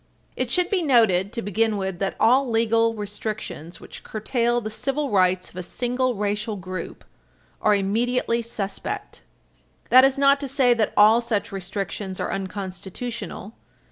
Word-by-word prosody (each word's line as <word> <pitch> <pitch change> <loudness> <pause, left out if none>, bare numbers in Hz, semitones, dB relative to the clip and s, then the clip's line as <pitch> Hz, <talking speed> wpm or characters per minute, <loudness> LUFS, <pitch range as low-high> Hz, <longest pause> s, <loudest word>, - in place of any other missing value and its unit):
It 255 -1 -2
should 360 +8 +1
be 390 -3 +2
noted, 220 - +3
to 230 - -3
begin 215 +2 +1
with, 190 -2 -3
that 195 -1 -1
all 255 +3 +4
legal 230 0 +2
restrictions 205 -5 -6
which - - -11
curtail 240 +2 0
the 215 -2 -5
civil 275 +5 -2
rights 185 -2 +2
of - - -14
a - - -2
single 250 +6 -1
racial 210 +1 -2
group 185 -1 -7 0.6
are 210 -1 +4
immediately 230 +4 0
suspect. 205 -4 -5 0.7
That 255 +1 +8
is 270 0 +3
not 280 0 +4
to 280 - -4
say 260 -2 +3
that 225 -3 0
all 215 +3 +7
such 225 -3 -2
restrictions 195 0 -5
are - - -2
unconstitutional. 195 +3 -6
220 Hz, 150 wpm, -24 LUFS, 195-245 Hz, 0.7 s, That